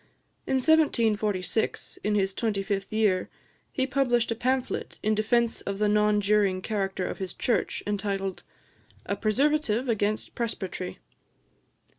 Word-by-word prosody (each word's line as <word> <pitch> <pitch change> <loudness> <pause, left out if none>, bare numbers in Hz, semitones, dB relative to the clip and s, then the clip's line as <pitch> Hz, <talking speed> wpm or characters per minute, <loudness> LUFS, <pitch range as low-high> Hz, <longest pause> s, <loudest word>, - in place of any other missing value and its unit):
In 265 - +1
1746, 220 - +1
in 210 0 +1
his 195 -1 +1
twenty 205 -2 -1
fifth 195 -1 -2
year, 210 -4 +2 0.4
he 260 - 0
published 245 -4 +1
a - - 0
pamphlet, 255 +2 -1
in 215 - +2
defence 225 +2 +1
of 200 0 -4
the 210 +1 +2
non 210 0 +3
juring 200 -2 +2
character 195 -3 -1
of - - -5
his 190 -1 -5
Church, 230 -7 0
entitled 195 -2 -2 0.6
"A 200 - -1
Preservative 255 +2 +1
against 215 -2 -1
Presbytery." 190 -6 -4
210 Hz, 130 wpm, -27 LUFS, 195-235 Hz, 0.6 s, non